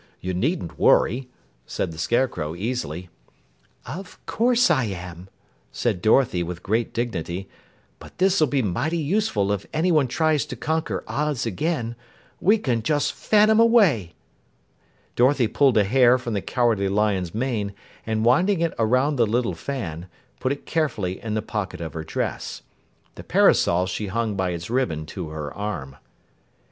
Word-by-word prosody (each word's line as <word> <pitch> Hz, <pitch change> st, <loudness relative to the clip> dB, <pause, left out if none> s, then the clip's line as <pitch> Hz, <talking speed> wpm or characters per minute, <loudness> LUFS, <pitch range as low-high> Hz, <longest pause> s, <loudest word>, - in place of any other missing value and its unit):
You 90 Hz, 0 st, -4 dB
needn't 105 Hz, -, -2 dB
worry," 125 Hz, +1 st, +3 dB, 0.4 s
said -, -, -3 dB
the 80 Hz, -, -10 dB
Scarecrow 85 Hz, -8 st, 0 dB
easily. 90 Hz, -, -4 dB, 0.8 s
"Of 180 Hz, +7 st, -8 dB
course 240 Hz, -2 st, +3 dB
I 130 Hz, -7 st, +2 dB
am," 90 Hz, -2 st, -7 dB, 0.4 s
said 90 Hz, -, -1 dB
Dorothy 110 Hz, -4 st, +3 dB
with 85 Hz, 0 st, -5 dB
great 110 Hz, +3 st, 0 dB
dignity. 95 Hz, -5 st, -3 dB, 0.5 s
"But -, -, -14 dB
this'll 185 Hz, -4 st, +3 dB
be 135 Hz, -1 st, 0 dB
mighty 125 Hz, -, -1 dB
useful 155 Hz, -, 0 dB
if 100 Hz, -1 st, -3 dB
anyone 155 Hz, -3 st, +2 dB
tries 155 Hz, +2 st, +1 dB
to -, -, -6 dB
conquer 160 Hz, +1 st, -2 dB
Oz 145 Hz, -4 st, -1 dB
again. 120 Hz, -, -2 dB, 0.4 s
We 210 Hz, +5 st, +4 dB
can 125 Hz, -, -1 dB
just 145 Hz, +5 st, 0 dB
fan 215 Hz, 0 st, +3 dB
'em 220 Hz, -, +4 dB
away." 195 Hz, -, +4 dB, 1.0 s
Dorothy 130 Hz, +1 st, +4 dB
pulled 130 Hz, +1 st, +3 dB
a 105 Hz, -, +5 dB
hair 125 Hz, +4 st, +5 dB
from 125 Hz, -3 st, -5 dB
the 100 Hz, -, -1 dB
Cowardly 115 Hz, -5 st, +1 dB
Lion's 100 Hz, -4 st, 0 dB
mane, 115 Hz, -4 st, -1 dB, 0.3 s
and 110 Hz, 0 st, -1 dB
winding 175 Hz, +10 st, +3 dB
it 165 Hz, -1 st, 0 dB
around 130 Hz, +6 st, +2 dB
the 115 Hz, -2 st, +3 dB
little 115 Hz, -2 st, 0 dB
fan, 85 Hz, -, -5 dB, 0.3 s
put 130 Hz, -, 0 dB
it 140 Hz, -, -5 dB
carefully 115 Hz, -, -1 dB
in 110 Hz, -1 st, -3 dB
the 110 Hz, -, -1 dB
pocket 95 Hz, -5 st, -4 dB
of 80 Hz, -3 st, -6 dB
her 80 Hz, -, -5 dB
dress. 80 Hz, -, -4 dB, 0.5 s
The -, -, -10 dB
parasol 90 Hz, +2 st, +3 dB
she 100 Hz, +3 st, -3 dB
hung 110 Hz, +2 st, -1 dB
by 95 Hz, -1 st, 0 dB
its 85 Hz, -1 st, -4 dB
ribbon 100 Hz, -11 st, -1 dB
to 90 Hz, -5 st, -5 dB
her 75 Hz, -2 st, -6 dB
arm. 85 Hz, -11 st, -5 dB
115 Hz, 155 wpm, -23 LUFS, 95-145 Hz, 1.0 s, a